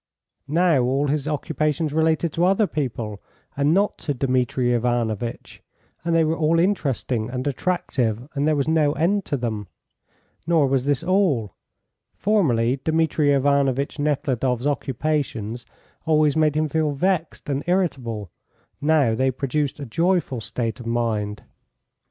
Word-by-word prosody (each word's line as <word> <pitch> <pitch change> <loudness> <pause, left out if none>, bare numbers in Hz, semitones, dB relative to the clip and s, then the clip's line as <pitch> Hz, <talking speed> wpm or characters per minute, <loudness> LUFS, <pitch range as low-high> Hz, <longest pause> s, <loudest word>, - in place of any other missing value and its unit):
Now 165 -2 +3
all 135 +4 +1
his 145 0 -1
occupations 155 0 -1
related 160 +1 +1
to 170 - 0
other 195 +4 +4
people 115 - -4 0.3
and 140 +2 +2
not 200 +4 +1
to 145 -3 -3
Dmitri 125 -1 +1
Ivanovitch, 120 -1 -2 0.4
and 170 0 0
they 165 - +4
were 160 +1 +1
all 165 0 +2
interesting 135 - 0
and 125 0 -4
attractive, 130 -6 -1
and 145 0 0
there 155 - +3
was 140 0 0
no 155 -2 +3
end 180 +7 +1
to 145 - -1
them. 110 -5 -3 0.8
Nor 165 -4 +4
was 135 0 0
this 145 0 +1
all. 170 - +1 0.6
Formerly 135 - +2
Dmitri 160 -2 +2
Ivanovitch 140 0 +1
Nekhludoff's 135 -4 0
occupations 135 -5 -2 0.4
always 155 -2 +3
made 155 -1 +2
him 155 0 +1
feel 155 -1 0
vexed 175 +2 -1
and 140 0 -1
irritable; 125 - -1 0.5
now 145 -6 +3
they 130 +4 +1
produced 140 +2 -2
a 140 - -5
joyful 165 -1 0
state 115 +1 -3
of 120 - -8
mind. 110 -3 -1
145 Hz, 140 wpm, -23 LUFS, 125-160 Hz, 0.8 s, other